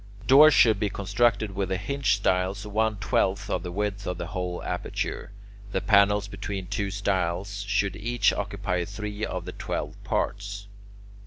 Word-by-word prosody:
Doors 145 +5 +8
should 110 -4 +5
be 105 -1 0
constructed 110 +1 +1
with 95 -1 -2
the 95 - 0
hinge 140 +5 +1
stiles 95 +1 0
one 110 +1 0
twelfth 100 0 0
of 90 - 0
the 90 0 -6
width 100 +1 -3
of 90 - -2
the 85 - -4
whole 90 0 -4
aperture. 90 +2 -4 0.4
The - - +1
panels 105 -1 +4
between 100 -1 -5
two 100 +1 -2
stiles 100 0 -1
should 100 -1 +1
each 120 +4 +1
occupy 95 -3 -2
three 105 +2 -6
of - - -3
the - - -5
twelve - - -5
parts. 100 0 -2
100 Hz, 160 wpm, -26 LUFS, 95-105 Hz, 0.4 s, Doors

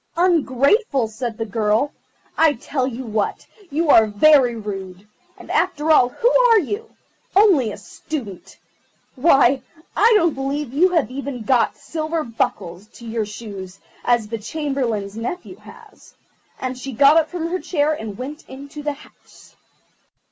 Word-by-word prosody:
"Ungrateful!" 300 - +2
said 220 +1 -5
the 225 - -3
girl. 215 +5 0 0.4
"I 320 -2 +4
tell 260 +1 -3
you 260 0 -5
what, 215 -2 -2 0.2
you 310 +1 +1
are 220 -1 +6
very 250 +3 +4
rude; 195 -2 -7 0.3
and, - - -10
after 300 +2 +1
all, 250 -5 +5
who 475 - +1 0.2
are 455 - +6
you? 410 - -4 0.5
Only 365 - +4
a - - -8
Student. 205 - -8 0.6
Why, 270 -2 +4 0.3
I 460 - +5
don't 335 -5 +2
believe 270 0 -3
you 350 +7 +4
have 325 -8 0
even 270 -3 -5
got 240 +1 +2
silver 320 0 -3
buckles 205 - -3
to 235 - -13
your 225 -2 -2
shoes 200 -3 -9 0.3
as 240 -3 +1
the 230 +1 -5
Chamberlain's 230 -5 -3
nephew 295 +11 -6
has"; - - -17 0.4
and 255 0 -3
she 260 +1 -7
got 280 +6 +6
up 315 -1 +2
from 350 -2 -4
her 370 +2 -2
chair 305 -4 0
and 220 -8 -6
went 285 +5 -7
into 280 +3 -9
the 295 0 -2
house. 280 - -19
265 Hz, 150 wpm, -21 LUFS, 225-310 Hz, 0.6 s, are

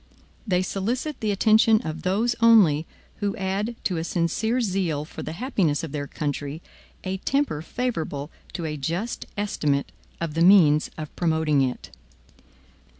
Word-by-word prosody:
They 185 -2 +2
solicit 240 +11 -2
the 215 - -1
attention 220 +2 +4
of 160 0 -5
those 220 +6 +1
only, 190 -10 +5 0.3
who 205 0 -1
add 200 +3 -2
to 180 - 0
a 160 - -2
sincere 175 +9 0
zeal 185 -9 -1
for - - -9
the 155 - -5
happiness 180 - 0
of 160 - -5
their 145 -1 -4
country, 145 0 -4 0.4
a 190 0 -2
temper 275 - 0
favorable 165 - -3 0.2
to 170 - -4
a 150 -1 -3
just 170 - -3
estimate 150 -9 0 0.3
of 165 -3 -3
the 165 - -1
means 165 -5 +6
of 155 -1 -7
promoting 160 -4 +2
it. 130 -2 -2
180 Hz, 150 wpm, -25 LUFS, 155-215 Hz, 0.4 s, means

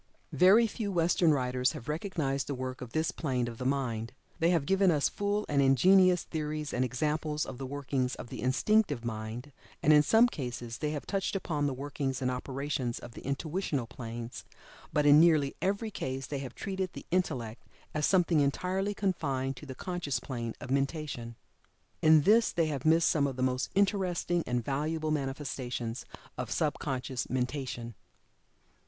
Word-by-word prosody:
Very 200 +6 +6
few 215 -2 -3
Western 170 -1 +3
writers 125 -1 +1
have 135 -6 -9
recognized 150 -4 -2
the 140 - -2
work 130 0 -5
of 125 -2 -7
this 160 +1 0
plane 130 -6 -1
of 115 -1 -7
the 125 - -1
mind. 120 -5 -1 0.3
They 165 - +3
have 170 -5 +2
given 195 +3 +3
us 150 -4 +3
full 205 +1 -1
and 140 -1 +2
ingenious 180 +7 +5
theories 150 -1 -4
and 125 - +1
examples 150 +4 -1
of 130 - -8
the 135 - -4
workings 135 -2 -2
of 120 - -9
the - - -6
Instinctive 140 - +2
Mind, 115 +4 -5 0.3
and 155 - +6
in 150 - +8
some 225 +9 +5
cases 120 - -5
they 150 - -1
have 150 -1 -4
touched 195 0 -1
upon 150 -6 -1
the 140 - -1
workings 135 -1 -3
and 130 -1 0
operations 130 -1 -3
of 120 - -9
the - - -10
Intuitional 145 -1 -2
planes, 115 0 -7 0.5
but 150 -2 +2
in 145 +1 +8
nearly 155 -4 +4
every 200 +3 -1
case 130 -7 -4
they 140 +1 -4
have 130 -3 -7
treated 190 -2 -3
the - - -9
Intellect 130 -11 -1 0.3
as 155 - -1
something 175 -2 +3
entirely 185 +8 0
confined 140 -10 -1
to 150 - -10
the 130 - -7
Conscious 175 -5 -3
plane 120 -4 -5
of 125 - -7
mentation. 135 -4 -2 0.7
In 155 -1 +7
this 220 +8 +4
they 165 - +1
have 145 -3 -3
missed 165 +1 +5
some 145 -3 +3
of 135 - -4
the 130 - -2
most 130 0 0
interesting 185 -4 +1
and 120 -2 -1
valuable 155 +3 -1
manifestations 135 -4 -3 0.3
of - - -3
sub - - 0
conscious 130 -1 -3
mentation. 125 -2 -3
145 Hz, 175 wpm, -30 LUFS, 130-170 Hz, 0.7 s, in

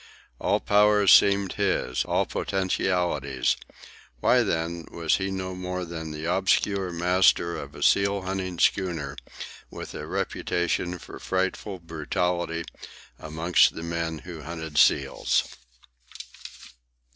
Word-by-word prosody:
All - - +1
powers 105 -1 +5
seemed 100 -1 +5
his, 65 -10 0
all - - +1
potentialities—why, 85 -10 -1
then, 85 +1 -2
was 85 -2 0
he 95 0 -2
no 95 -1 -4
more 90 0 -4
than 80 -2 -6
the 75 +1 -6
obscure 95 +1 +1
master 85 0 +3
of - - -8
a - - -5
seal 100 0 +3
hunting 95 -1 -3
schooner 80 -8 0 0.5
with - - -8
a - - -6
reputation 90 +1 -1
for - - -11
frightful 95 +1 -2
brutality 85 +1 -2 0.6
amongst 80 +3 +2
the 80 - -6
men 85 -1 -3
who 85 -3 -8
hunted 80 -1 -3
seals? 70 -2 +3
90 Hz, 110 wpm, -26 LUFS, 80-95 Hz, 0.6 s, powers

